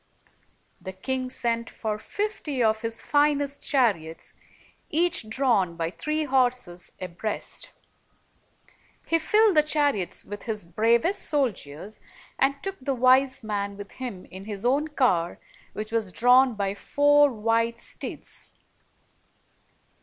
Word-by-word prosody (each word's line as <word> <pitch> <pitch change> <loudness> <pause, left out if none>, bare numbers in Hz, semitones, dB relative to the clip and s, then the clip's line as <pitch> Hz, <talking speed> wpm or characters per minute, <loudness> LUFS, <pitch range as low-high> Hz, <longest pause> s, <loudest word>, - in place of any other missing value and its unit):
The 190 - -7
king 255 +6 -3
sent 235 -2 -1
for 215 -1 -4
fifty 310 - -3
of 220 0 +2
his 230 0 -3
finest 290 -1 +1
chariots, 200 - 0 0.6
each 325 -8 +1
drawn 220 -8 +1
by 165 0 -2
three 305 +8 -2
horses 250 -10 0
abreast. 185 +4 -4 1.3
He 330 - +2
filled 425 +4 +4
the 305 - +7
chariots 290 - 0
with 205 0 -7
his 215 -6 -3
bravest 230 - +2
soldiers, 215 - -2 0.4
and 275 +1 +3
took 390 0 -3
the 270 +1 -1
wise 255 +1 +4
man 200 -2 -3
with 205 -1 -9
him 240 -8 -7
in 190 +1 -9
his 205 0 -6
own 280 +5 +2
car, 240 - +1 0.4
which 215 +1 -5
was 225 -4 0
drawn 250 +3 +5
by 200 -1 -1
four 290 +6 +4
white 230 +1 0
steeds. - - -7
235 Hz, 125 wpm, -26 LUFS, 205-280 Hz, 1.3 s, the